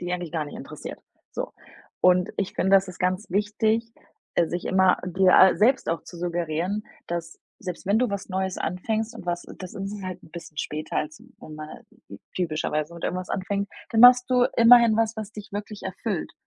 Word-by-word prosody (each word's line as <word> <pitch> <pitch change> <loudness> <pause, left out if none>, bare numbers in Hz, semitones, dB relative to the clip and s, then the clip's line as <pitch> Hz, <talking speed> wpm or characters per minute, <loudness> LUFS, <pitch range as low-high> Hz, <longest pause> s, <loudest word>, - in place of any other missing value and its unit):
die 175 0 -3
eigentlich 175 -3 -4
gar 160 -3 -1
nicht 145 - -9
interessiert. - - -8 0.3
So, - - -5 0.5
und 180 +1 +4
ich 195 - -2
finde, 190 - +1
das 195 -1 +5
ist 180 - -9
ganz 185 +3 -1
wichtig, 215 +3 0 0.4
äh, 170 - +3
sich 175 - -4
immer 190 -1 +4
dir 185 +1 +6
selbst 255 +5 +3
auch 165 - -1
zu 175 - -12
suggerieren, 175 +3 -2 0.2
dass 170 -1 -5 0.2
selbst 180 -2 -6
wenn 205 +3 +3
du 250 -4 +1
was 200 -1 -4
Neues 190 -1 -2
anfängst 220 +6 -2
und 230 - -10
was, 175 0 -2
das 185 +1 -8
ist 200 0 -5
halt 185 0 -6
'n - - -17
bisschen 160 -2 -10
später, 155 0 -4
als 155 0 -3 0.2
wenn 155 - -10
man 155 0 -8 0.7
typischerweise 155 -2 -1
mit 170 - -7
irgendwas 185 0 -3
anfängt, 200 +1 -2 0.2
dann 225 - +2
machst 245 +1 +8
du 250 -1 +4
immerhin 230 -1 +7
was, 225 0 +1
was 215 -1 -5
dich 210 -2 -10
wirklich 205 0 -6
erfüllt. 190 0 -3
190 Hz, 190 wpm, -25 LUFS, 175-210 Hz, 0.7 s, machst